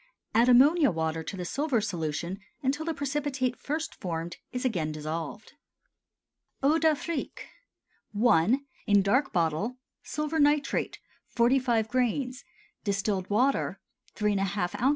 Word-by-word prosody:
Add 235 +3 +4
ammonia 285 +5 +6
water 160 -1 -1
to 190 - -6
the 180 - -4
silver 275 - 0
solution 170 -2 -3 0.2
until 285 +4 0
the 330 - 0
precipitate 275 -3 -1
first 310 +3 -3
formed 170 -2 -5
is 250 +1 -3
again 170 -11 0
dissolved. 155 +6 -5 1.1
EAU 305 +4 +4
D'AFRIQUE. 315 -1 -1 0.8
I. 220 +6 +4 0.3
(In 205 -1 +5
Dark 260 +8 +2
Bottle.) 175 +8 0 0.2
Silver 305 +1 -2
nitrate 290 -1 +2 0.3
45 240 -2 +2
grains. 255 +2 -1 0.4
Distilled 195 -2 -1
water 255 +7 +1 0.4
3½ 195 -3 -1
oz. 260 - +4
240 Hz, 115 wpm, -28 LUFS, 185-275 Hz, 1.1 s, ammonia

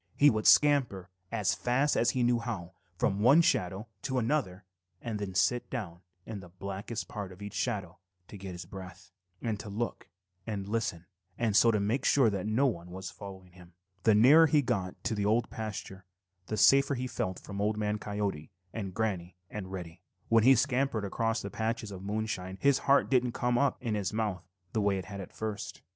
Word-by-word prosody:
He 145 0 +7
would 110 -1 0
scamper 125 -11 +4 0.2
as 110 -4 +1
fast 135 +4 +1
as 120 - +3
he 125 0 +1
knew 120 0 +3
how 100 -7 -5 0.2
from 100 - +1
one 135 +10 +6
shadow 95 - 0
to 130 - -2
another 115 -7 -1 0.3
and 110 -3 -4
then 95 -2 -5
sit 120 +6 +2
down 95 -9 -5 0.2
in 110 -3 -6
the 90 -2 -12
blackest 100 +5 -5
part 100 -4 -6
of 90 - -13
each 100 0 -7
shadow 100 -9 -3 0.3
to - - -11
get 95 -2 -7
his 90 0 -7
breath, 95 -1 -10 0.3
and 110 -3 -1
to 105 - -7
look 115 +4 -4 0.4
and 100 -3 -3
listen 105 -6 -2 0.3
and 115 -4 0
so 115 +2 +6
make 105 +6 0
sure 130 -6 +4
that 100 +1 -3
no 115 +6 +2
one 90 -9 -2
was 95 +1 -7
following 95 -2 -10
him. 90 -1 -16 0.3
The 110 +1 +4
nearer 145 +9 +7
he 145 0 +3
got 95 -5 -2
to 120 - -1
the 105 -1 0
Old 115 +2 +1
Pasture, 105 -3 -6 0.4
the 110 - -3
safer 140 +3 +5
he 125 0 -3
felt 95 -7 -3
from 100 0 -6
Old 105 +1 +1
Man 105 0 -1
Coyote 100 -7 -3 0.2
and 95 -5 -5
Granny 95 -6 -2 0.2
and 95 -3 -6
Reddy 90 -2 -7
Fox. - - -48
When 115 -1 +5
he 135 +1 +8
scampered 125 -3 +1
across 115 +3 -1
the 100 - -5
patches 110 0 -2
of 95 -2 -8
moonshine 100 -2 -3
his 140 -1 +3
heart 140 - +5
didn't 125 -2 +2
come 125 -1 0
up 140 -2 +2
in 115 -3 -1
his 100 -3 -1
mouth 105 -4 -2 0.3
the 110 - +1
way 100 -1 +2
it 95 - -5
had 100 -1 -7
at 95 - -9
first. 110 -2 -5
105 Hz, 200 wpm, -30 LUFS, 95-120 Hz, 0.4 s, he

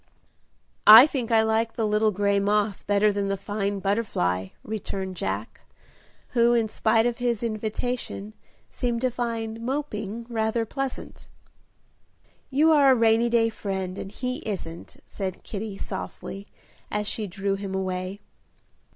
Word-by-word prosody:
"I 225 +5 +12
think 265 -6 -3
I 225 -1 +4
like 220 +1 +1
the 225 - -1
little 210 +1 +2
gray 200 0 +1
moth 205 0 0
better 205 +1 +3
than 200 0 -1
the 195 0 -1
fine 200 0 -2
butterfly," 195 - 0 0.2
returned 195 -3 -4
Jack, 100 - -4 0.7
who, 240 0 +3
in 230 -2 +2
spite 225 +1 +2
of 240 0 -1
his 240 -2 0
invitation, 220 -1 -3 0.4
seemed 240 -2 -2
to 255 -1 +1
find 230 -2 -3
"moping" 230 -4 -3
rather 225 -1 0
pleasant. 270 +3 -5 1.2
"You 300 +4 +4
are 285 -3 +6
a - - +6
rainy 230 0 +3
day 230 -1 +3
friend, 190 -4 -4
and 195 - -6
he 250 +3 -3
isn't," 170 -5 -6
said 190 -2 -5
Kitty, 205 -1 -5
softly, 195 +1 -6 0.4
as 210 0 -2
she 215 -1 -2
drew 195 +2 -2
him 195 -1 -4
away. 185 +1 -3
215 Hz, 140 wpm, -25 LUFS, 195-235 Hz, 1.2 s, I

